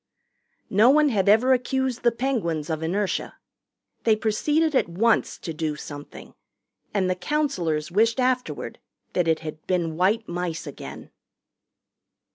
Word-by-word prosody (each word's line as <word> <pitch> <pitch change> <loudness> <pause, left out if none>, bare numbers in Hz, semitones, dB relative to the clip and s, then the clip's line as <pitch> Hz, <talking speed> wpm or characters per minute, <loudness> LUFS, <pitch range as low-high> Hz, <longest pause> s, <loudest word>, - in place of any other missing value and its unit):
No 215 +5 +6
one 300 +2 +5
had 200 -5 +2
ever 240 +5 +5
accused 260 0 -1
the 240 - +4
Penguins 205 - -2
of 160 0 -2
inertia. 190 +5 -1 0.7
They 220 -2 +4
proceeded 295 +9 +1
at 260 - +2
once 220 +7 +1
to 165 - -6
do 155 -1 -2
something. 145 -1 -10 0.6
And 195 -3 +1
the 185 - +2
counselors 180 - -1
wished 225 +6 +2
afterward 255 0 -1 0.3
that 180 -2 +1
it 160 -1 +2
had 155 -1 -8
been 170 -3 0
white 210 +5 +2
mice 175 -1 -3
again. 145 - -9
200 Hz, 135 wpm, -24 LUFS, 165-250 Hz, 0.7 s, No